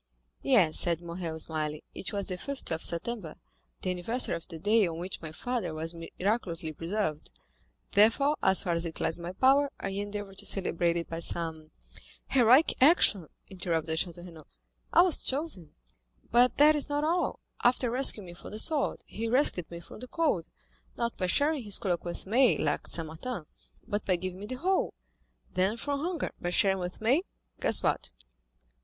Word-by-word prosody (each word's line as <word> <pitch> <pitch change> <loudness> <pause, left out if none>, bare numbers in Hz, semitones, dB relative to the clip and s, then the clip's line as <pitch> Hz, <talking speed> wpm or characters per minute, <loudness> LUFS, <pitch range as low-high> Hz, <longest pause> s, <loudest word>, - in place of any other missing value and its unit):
"Yes," 200 - +4
said 170 -2 +1
Morrel, 170 -1 -6
smiling, 155 -1 -3
"it - - -5
was 200 -1 -3
the 185 - -3
5th 280 +1 -4
of 160 0 -2
September, 170 -1 -2 0.5
the 185 - 0
anniversary 225 +8 0
of 170 - -8
the 165 - -7
day 205 +3 +3
on 165 -1 -5
which 180 +3 -5
my 160 -2 -7
father 240 0 -3
was 160 +2 -3
miraculously 170 -1 -2
preserved; 165 -1 -3 0.6
therefore, 230 +8 +4
as 190 0 +6
far 175 - 0
as 170 0 0
it 160 - -6
lies 165 - 0
in - - -9
my 175 - -4
power, 275 +6 +4
I 195 - -4
endeavor 205 0 -5
to 195 - -7
celebrate 175 -3 +4
it 170 - -3
by 165 - -5
some——" 160 -2 -2 0.6
20237m - - -4
"Heroic 255 +4 +5
action," 255 - +4 0.2
interrupted 165 -4 -1
Château 175 0 -2
Renaud. 165 -4 -13 0.4
"I 345 - +7
was 360 -4 +3
chosen. 265 - -2 0.6
But 245 +2 +4
that 300 +2 +7
is 295 0 0
not 290 +1 -1
all—after 265 -7 0
rescuing 245 -5 +3
me 175 - -10
from 175 - -11
the 210 - -7
sword, 295 +5 +1
he 230 +2 -5
rescued 225 - +2
me 170 0 -8
from 170 - -12
the 255 - -8
cold, 250 - 0 0.5
not 235 -1 -2
by 185 - -2
sharing 290 - +2
his 205 -4 +3
cloak 175 -4 -2
with 175 -1 -6
me, 240 +6 +3
like - - -1
St. 165 - +3
Martin, 165 +3 -6 0.4
but 210 -2 -2
by 185 - +3
giving 185 +1 -5
me 205 - -7
the 255 - -5
whole; 370 +8 0 0.6
then 190 +5 +1
from 285 +3 -2
hunger 335 +1 -3
by 175 - -2
sharing 190 +2 +2
with 180 +2 -6
me—guess 250 - -1
what?" - - 0
195 Hz, 180 wpm, -29 LUFS, 170-250 Hz, 0.6 s, I